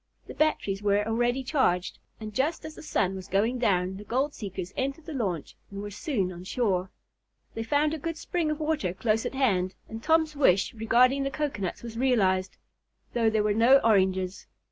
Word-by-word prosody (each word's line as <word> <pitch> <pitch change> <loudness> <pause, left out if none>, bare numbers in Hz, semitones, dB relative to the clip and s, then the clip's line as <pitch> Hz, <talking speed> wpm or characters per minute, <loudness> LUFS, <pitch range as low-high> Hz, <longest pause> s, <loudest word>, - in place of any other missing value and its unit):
The - - -9
batteries 205 -10 0
were 205 0 +2
already 240 +3 +1
charged, 250 - 0 0.2
and 215 -1 -7
just 295 +9 -1
as 315 - -7
the - - -11
sun 190 -10 0
was 190 0 -7
going 220 +7 +1
down 190 -5 +1
the 205 - -9
gold 265 +7 -1
seekers 190 -3 -6
entered 275 +4 -3
the 320 - -6
launch 190 - -3
and 200 - -7
were 205 0 -6
soon 205 - -2
on 175 0 -9
shore. 190 -4 0 0.6
They 225 - -4
found 290 +6 +1
a 320 - -3
good 330 +2 -4
spring 335 -2 -1
of 305 0 -2
water 300 - -1
close 220 +1 0
at - - -7
hand, 190 -9 +1
and 225 0 -7
Tom's 320 +1 +2
wish 195 -10 +3
regarding 245 +4 +3
the 275 - 0
cocoanuts 270 -12 -3
was 230 -1 -6
realized, 190 -8 +2 0.6
though 230 -2 +3
there 215 -1 +1
were 210 0 +2
no 235 +5 +6
oranges. 190 -3 +1
225 Hz, 190 wpm, -27 LUFS, 195-275 Hz, 0.6 s, no